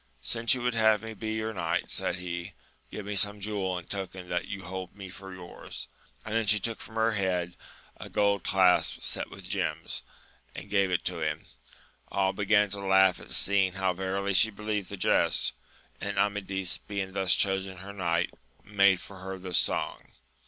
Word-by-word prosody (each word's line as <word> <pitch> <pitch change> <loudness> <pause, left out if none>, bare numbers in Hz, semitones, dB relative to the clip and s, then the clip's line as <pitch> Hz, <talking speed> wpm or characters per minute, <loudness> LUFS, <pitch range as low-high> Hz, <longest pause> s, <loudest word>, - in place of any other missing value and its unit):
Since 115 - +3
you 125 - -4
would 125 0 +1
have 110 -1 +4
me 110 0 -5
be 110 +1 -4
your 110 0 -2
knight, 85 -4 -1
said - - 0
he, 90 0 -5 0.4
give 105 - -6
me 105 0 -3
some 105 +1 +2
jewel 100 -3 -1
in 85 - -7
token 95 -2 -5
that 90 +1 -1
you 95 -1 -5
hold 95 0 -6
me 100 -2 -8
for 95 +1 -10
yours; 90 -1 -8 0.4
and 110 - -4
then 115 -1 +1
she 105 +1 +6
took 115 +2 -2
from 110 - -11
her 110 0 +3
head 90 -4 -1 0.4
a - - -8
gold 100 -1 +2
clasp 95 -2 +3
set - - -1
with - - -11
gems, - - -2 0.5
and 100 - -8
gave 100 -2 +3
it 90 -1 0
him. - - -2 0.6
All 95 -1 +1
began 105 0 +3
to 100 - -3
laugh 95 -1 +4
at - - -12
seeing 95 -2 +2
how 95 -1 +1
verily 95 +2 -1
she 110 +4 +6
believed 105 -2 -3
the 100 - -5
jest, - - +3 0.5
and - - -3
Amadis, 95 -3 +1
being 100 -2 -4
thus 95 -3 +3
chosen 95 -1 0
her 100 +2 -8
knight, 85 -2 0 0.3
made 100 -2 +4
for 95 +1 -11
her 95 +1 -5
this 90 -2 +1
song. - - -1
95 Hz, 185 wpm, -29 LUFS, 95-105 Hz, 0.6 s, she